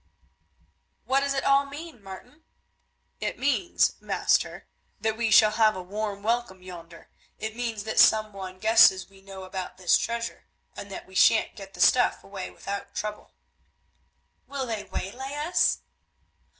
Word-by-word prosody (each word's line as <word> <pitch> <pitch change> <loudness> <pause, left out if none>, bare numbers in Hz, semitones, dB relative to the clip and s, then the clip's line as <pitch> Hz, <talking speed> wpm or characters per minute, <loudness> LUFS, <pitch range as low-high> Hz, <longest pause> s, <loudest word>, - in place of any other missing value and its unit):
"What 265 +1 +2
does 280 0 -1
it 270 - -1
all 275 0 +3
mean, 290 -3 -9
Martin?" 245 +11 -12 0.8
"It - - -3
means, 285 +6 +1
master, - - 0 0.3
that 220 0 -1
we 230 0 0
shall 215 0 +7
have 215 0 +3
a 185 - -6
warm 200 +1 -4
welcome 225 -5 -1
yonder; 170 -2 -12 0.3
it 220 0 -5
means 230 -3 -3
that 220 0 -1
some 215 -1 +5
one 190 -1 -8
guesses 215 -2 +5
we 195 0 -18
know 195 -1 -10
about 185 0 -6
this 180 -2 +3
treasure, 235 0 -4 0.3
and 200 - -8
that 195 - -8
we 190 - -18
shan't 220 +3 +4
get 195 -1 -11
the - - -5
stuff 250 - +4
away 195 -1 -7
without 200 0 -7
trouble." 210 0 -6 1.1
"Will 275 -2 -4
they 225 -4 -4
waylay 265 +9 -6
us?" 305 +5 +1
215 Hz, 150 wpm, -26 LUFS, 195-245 Hz, 1.1 s, shall